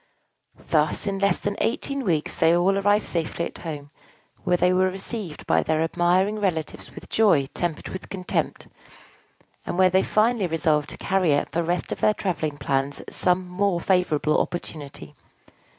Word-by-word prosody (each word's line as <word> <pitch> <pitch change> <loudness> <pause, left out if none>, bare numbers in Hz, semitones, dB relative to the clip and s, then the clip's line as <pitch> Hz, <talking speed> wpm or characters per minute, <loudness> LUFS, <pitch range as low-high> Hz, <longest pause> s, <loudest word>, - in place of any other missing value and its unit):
Thus - - +1
in 195 -1 -2
less 200 0 +2
than 205 0 -3
eighteen 275 +3 0
weeks 165 -8 0
they 165 +1 +4
all 190 +3 +3
arrived 205 +1 +2
safely 170 0 -2
at - - -8
home, 145 -3 -7 0.5
where 180 - +2
they 180 +1 +3
were 185 +1 +3
received 195 -2 -6
by - - +3
their 160 0 +1
admiring 180 +5 +1
relatives 170 -6 -3
with - - -10
joy 195 -11 +3
tempered 170 -4 -3
with 185 - -7
contempt, 185 -2 -3 1.0
and - - -4
where 185 -1 +5
they 190 +1 +4
finally 215 -1 +2
resolved 155 -3 +1
to - - -8
carry 185 -6 +2
out - - -1
the 170 - 0
rest 175 +2 -2
of - - -3
their 215 - +3
travelling 160 -6 -2
plans 135 0 -1
at - - -11
some 180 0 +1
more 180 0 0
favorable 165 -5 +2
opportunity. 155 -5 -6
180 Hz, 165 wpm, -24 LUFS, 160-195 Hz, 1.0 s, where